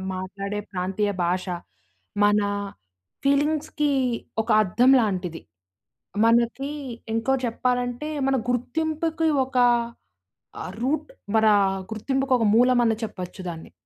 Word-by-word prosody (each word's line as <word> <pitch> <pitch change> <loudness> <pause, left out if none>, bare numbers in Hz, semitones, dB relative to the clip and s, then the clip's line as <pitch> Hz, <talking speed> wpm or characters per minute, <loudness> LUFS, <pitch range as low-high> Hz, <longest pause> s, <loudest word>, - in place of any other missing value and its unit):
మాట్లాడే 200 +2 -4
ప్రాంతీయ 190 +3 -1
భాష. 180 +2 0 0.8
మన 205 0 +4 0.9
ఫీలింగ్స్‌కీ 295 +1 +1 0.5
ఒక 230 - -13
అద్దం 240 +7 +3
లాంటిది. 180 -6 -2 0.8
మనకీ 235 +5 +2 0.4
ఇంకో 230 +4 +1
చెప్పాలంటే, 245 +3 -1 0.2
మన 270 - +2 0.2
గుర్తింపుకి 320 +5 -1 0.2
ఒకా 255 -2 +3 0.9
ఆహ్, 185 - -6
రూట్. 285 - -1 0.3
మరా 220 -1 +5 0.4
గుర్తింపుకొక 260 +2 0
మూలమని 240 -1 +4
చెప్పచ్చు 185 -3 -6
దాన్ని. 165 -1 -8
240 Hz, 90 wpm, -24 LUFS, 205-270 Hz, 0.9 s, మరా